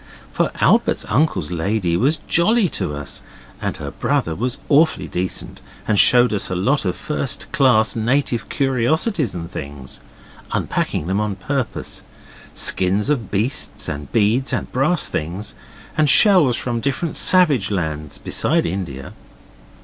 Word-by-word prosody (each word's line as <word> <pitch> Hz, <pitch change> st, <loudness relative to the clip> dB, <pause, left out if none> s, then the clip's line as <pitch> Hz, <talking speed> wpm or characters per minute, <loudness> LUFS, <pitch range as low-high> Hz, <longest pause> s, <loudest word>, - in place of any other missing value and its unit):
For -, -, +1 dB
Albert's -, -, +2 dB
uncle's 110 Hz, -, +1 dB
lady 90 Hz, +1 st, -1 dB
was 135 Hz, -, +2 dB
very -, -, -19 dB
jolly 205 Hz, +3 st, +3 dB
to 75 Hz, -, -3 dB
us, 70 Hz, -2 st, -8 dB, 0.4 s
and -, -, -3 dB
her -, -, -6 dB
brother 80 Hz, -, -1 dB
was 120 Hz, -, -2 dB
awfully 155 Hz, +2 st, +3 dB
decent, 90 Hz, +1 st, -4 dB, 0.3 s
and 105 Hz, -2 st, +3 dB
showed 125 Hz, -2 st, +6 dB
us 100 Hz, -, 0 dB
a 90 Hz, -, -2 dB
lot 125 Hz, +9 st, +1 dB
of 90 Hz, -, -1 dB
first 140 Hz, -2 st, -4 dB
class 120 Hz, -6 st, +3 dB
native 120 Hz, +1 st, 0 dB
curiosities 135 Hz, -, 0 dB
and 85 Hz, 0 st, -6 dB
things, 70 Hz, -4 st, -7 dB, 0.5 s
unpacking -, -, -2 dB
them 95 Hz, +4 st, 0 dB
on 105 Hz, -2 st, -2 dB
purpose; 130 Hz, +7 st, -4 dB, 0.5 s
skins 95 Hz, +8 st, +1 dB
of 120 Hz, -8 st, -2 dB
beasts, 110 Hz, +7 st, -2 dB
and 75 Hz, -2 st, -6 dB
beads, 115 Hz, +5 st, +1 dB
and -, -, -3 dB
brass 140 Hz, +5 st, +1 dB
things, 90 Hz, +7 st, -4 dB, 0.4 s
and 155 Hz, -2 st, +2 dB
shells 180 Hz, -, +6 dB
from 120 Hz, -2 st, -2 dB
different 140 Hz, +5 st, -2 dB
savage 150 Hz, -, +3 dB
lands 80 Hz, -6 st, -3 dB
besides -, -, +1 dB
India. 80 Hz, -7 st, -5 dB
110 Hz, 140 wpm, -20 LUFS, 90-140 Hz, 0.5 s, showed